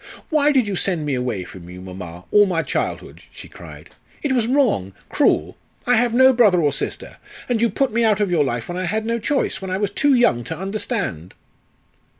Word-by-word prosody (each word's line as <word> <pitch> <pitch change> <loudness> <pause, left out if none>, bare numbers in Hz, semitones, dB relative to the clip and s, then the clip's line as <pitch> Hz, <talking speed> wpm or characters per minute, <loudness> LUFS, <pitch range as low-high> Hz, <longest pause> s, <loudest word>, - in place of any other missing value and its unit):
"Why 300 -1 +3
did 260 -6 +2
you 200 - -2
send 175 -4 -1
me 145 - -1
away 125 -7 -2
from 90 -1 -12
you, 90 +1 -10
mamma, 90 -2 -9
all 205 -1 +5
my 165 -3 0
childhood," - - -4
she - - -12
cried. - - -13 0.3
"It 290 - 0
was 240 -4 +1
wrong 240 - +1 0.2
cruel. - - +1 0.3
I 245 - +3
have 240 +1 +2
no 260 +2 +5
brother 210 -7 +4
or 150 -3 +2
sister. - - -5 0.3
And 240 -3 0
you 235 - +3
put 260 +4 -1
me 235 +1 +2
out 215 -2 +3
of 205 -3 0
your 165 -4 +3
life 120 -4 -3
when 175 +1 -4
I 185 - -2
had 215 +5 -2
no 230 +1 -1
choice, 275 -1 -1
when 190 - -5
I 185 - -1
was 200 -1 -1
too 285 +5 +2
young 120 - +2
to - - -5
understand." 195 - -4
200 Hz, 215 wpm, -21 LUFS, -, 0.3 s, all